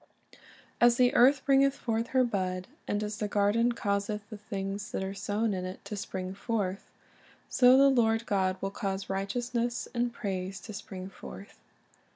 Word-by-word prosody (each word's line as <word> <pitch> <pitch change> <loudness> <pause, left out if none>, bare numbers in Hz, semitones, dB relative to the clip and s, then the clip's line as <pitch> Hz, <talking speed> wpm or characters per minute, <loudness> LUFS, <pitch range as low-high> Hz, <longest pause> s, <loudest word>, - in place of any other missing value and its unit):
"As 240 0 +6
the 250 +1 +4
earth 270 0 +5
bringeth 275 0 +4
forth 230 -4 -1
her 260 +1 +3
bud, 185 -5 -1 0.2
and 205 +1 -1
as 210 0 -4
the 210 - -1
garden 210 +4 +2
causeth 205 -1 -2
the 215 - -6
things 200 0 -4
that - - -1
are 190 0 -3
sown 205 +2 -1
in 185 -1 -3
it 185 +1 -7
to 210 - -5
spring 190 -2 -4
forth, 200 -2 -3 0.6
so 250 0 +6
the 275 +1 +7
Lord 230 -4 +3
God 190 -2 +1
will 195 - -2
cause 195 -1 -3
righteousness 235 +5 -2
and 240 0 0
praise 190 -4 -4
to 215 - -9
spring 190 -2 -7
forth." 195 +2 -11
210 Hz, 170 wpm, -29 LUFS, 195-235 Hz, 0.6 s, the